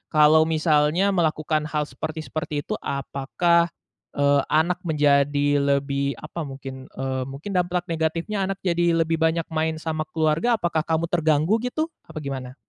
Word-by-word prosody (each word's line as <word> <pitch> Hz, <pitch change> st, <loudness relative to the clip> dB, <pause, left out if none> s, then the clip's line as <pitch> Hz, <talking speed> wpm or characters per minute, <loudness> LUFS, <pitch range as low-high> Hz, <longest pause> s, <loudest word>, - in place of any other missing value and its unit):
kalau 155 Hz, +1 st, +6 dB
misalnya 155 Hz, +4 st, +2 dB
melakukan 155 Hz, -3 st, 0 dB
hal 150 Hz, 0 st, -1 dB
seperti 155 Hz, +3 st, -6 dB
seperti 150 Hz, -2 st, -4 dB
itu -, -, -4 dB
apakah, 155 Hz, +5 st, +1 dB, 0.5 s
eee, 140 Hz, 0 st, +3 dB
anak 170 Hz, +3 st, +2 dB
menjadi 145 Hz, -1 st, +3 dB
lebih 140 Hz, -1 st, 0 dB
apa 155 Hz, +4 st, -6 dB
mungkin, 135 Hz, -1 st, -8 dB
eee, 130 Hz, -1 st, -2 dB
mungkin 140 Hz, +9 st, -7 dB
dampak 180 Hz, -1 st, 0 dB
negatifnya 165 Hz, +5 st, -1 dB
anak 195 Hz, -, -2 dB
jadi 170 Hz, -2 st, +2 dB
lebih 165 Hz, 0 st, -1 dB
banyak 160 Hz, +1 st, +2 dB
main 160 Hz, 0 st, 0 dB
sama 155 Hz, -1 st, -3 dB
keluarga 160 Hz, +9 st, +1 dB
apakah 170 Hz, -5 st, 0 dB
kamu 160 Hz, +1 st, +1 dB
terganggu 160 Hz, +5 st, +2 dB
gitu? 310 Hz, +7 st, -2 dB, 0.2 s
Apa 155 Hz, -2 st, -7 dB
gimana? 130 Hz, -2 st, -5 dB
155 Hz, 145 wpm, -24 LUFS, 145-170 Hz, 0.5 s, kalau